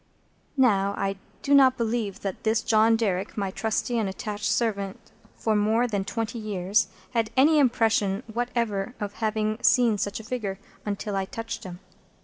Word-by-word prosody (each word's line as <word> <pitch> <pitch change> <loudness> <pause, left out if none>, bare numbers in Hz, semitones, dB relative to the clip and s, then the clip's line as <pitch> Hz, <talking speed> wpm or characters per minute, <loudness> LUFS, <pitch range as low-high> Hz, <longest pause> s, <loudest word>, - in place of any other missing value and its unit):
Now 200 -6 +3
I 195 0 -1 0.3
do 285 - +2
not 265 -2 +6
believe 220 -4 -2
that 195 -2 -5
this 220 0 +2
John 220 +1 +4
Derrick, 200 -3 -1
my 195 -2 -1
trusty 225 +3 -1
and 210 -3 0
attached 205 +2 -5
servant 205 -3 -2 0.2
for 220 -1 0
more 220 +3 +2
than 205 -5 -1
twenty 225 +2 -3
years, 200 -1 +1 0.2
had 230 -3 0
any 300 +3 +6
impression 225 -5 +2
whatever 235 -1 -2
of 205 -2 -4
having 215 0 0
seen 245 -2 +5
any 215 - 0
such 200 +1 -2
figure, 215 -5 -3 0.3
until 205 0 -3
I 195 0 0
touched 225 +2 -6
him. 180 0 -8
215 Hz, 160 wpm, -26 LUFS, 200-230 Hz, 0.3 s, not